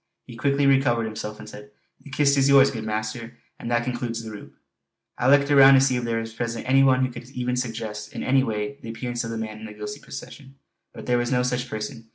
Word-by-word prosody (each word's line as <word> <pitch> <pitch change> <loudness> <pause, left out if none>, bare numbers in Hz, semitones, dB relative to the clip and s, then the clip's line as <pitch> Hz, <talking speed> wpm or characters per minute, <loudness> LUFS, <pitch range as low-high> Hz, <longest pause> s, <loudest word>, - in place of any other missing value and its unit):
He 120 - -11
quickly 140 +3 +1
recovered 135 -4 +3
himself 105 -1 -6
and - - -11
said: 105 0 -11 0.3
"The - - -14
kist 140 0 +2
is 135 0 +3
yours, 140 0 +6
good 110 -3 -5
master; 110 +2 -4 0.2
and 115 - -6
that 120 0 +1
concludes 120 -2 -4
the 110 - -7
roup!" 105 - -11 0.6
I 125 - +2
looked 140 +1 +4
around 135 -1 +8
to - - +6
see 135 -1 +2
if 125 - -2
there 115 -1 -1
was 115 0 -6
present 115 +1 -4
any 135 +1 +5
one 130 -1 +4
who 130 - -5
could 120 +1 -10
even 125 -1 -2
suggest 110 -4 -4
in - - -6
any 130 0 +3
way 110 +3 -3
the 115 - -8
appearance 120 +1 -4
of 115 - -5
the 115 - -4
man 110 -1 -6
in 110 - -9
the 105 - -10
ghostly 105 +7 -7
procession. 135 0 -10 0.4
But - - -10
there 120 -1 +2
was 120 +1 -2
no 125 -1 +2
such 125 0 -2
person. 110 +1 -6
120 Hz, 245 wpm, -24 LUFS, 115-135 Hz, 0.6 s, around